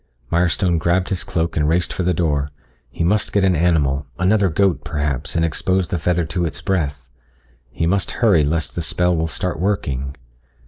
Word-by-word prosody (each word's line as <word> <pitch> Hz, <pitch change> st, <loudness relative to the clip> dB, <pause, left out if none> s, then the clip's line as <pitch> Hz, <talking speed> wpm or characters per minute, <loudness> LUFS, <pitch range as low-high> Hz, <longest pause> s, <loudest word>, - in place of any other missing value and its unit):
Mirestone 85 Hz, 0 st, +2 dB
grabbed 90 Hz, +3 st, +1 dB
his 95 Hz, -, -1 dB
cloak 85 Hz, 0 st, -2 dB
and 75 Hz, -1 st, +1 dB
raced 85 Hz, +2 st, +1 dB
for -, -, -3 dB
the 90 Hz, 0 st, +2 dB
door. 75 Hz, -4 st, 0 dB, 0.4 s
He -, -, -3 dB
must 105 Hz, +5 st, +1 dB
get 100 Hz, -, +2 dB
an 95 Hz, -2 st, +3 dB
animal 75 Hz, -4 st, +1 dB
another 95 Hz, +2 st, +3 dB
goat, 95 Hz, +2 st, +1 dB
perhaps, 75 Hz, -3 st, -2 dB
and 80 Hz, 0 st, +2 dB
expose 90 Hz, +2 st, 0 dB
the 90 Hz, -, -1 dB
feather 85 Hz, +1 st, +1 dB
to 85 Hz, +3 st, -2 dB
its 80 Hz, -, -3 dB
breath. 70 Hz, -8 st, -2 dB, 0.6 s
He 80 Hz, -, -2 dB
must 95 Hz, +1 st, +1 dB
hurry 100 Hz, -10 st, +3 dB
lest 80 Hz, +2 st, -1 dB
the 85 Hz, -, -3 dB
spell 90 Hz, +2 st, +1 dB
will 80 Hz, 0 st, 0 dB
start 85 Hz, +1 st, -3 dB
working. 70 Hz, -9 st, -1 dB
85 Hz, 185 wpm, -20 LUFS, 75-90 Hz, 0.6 s, an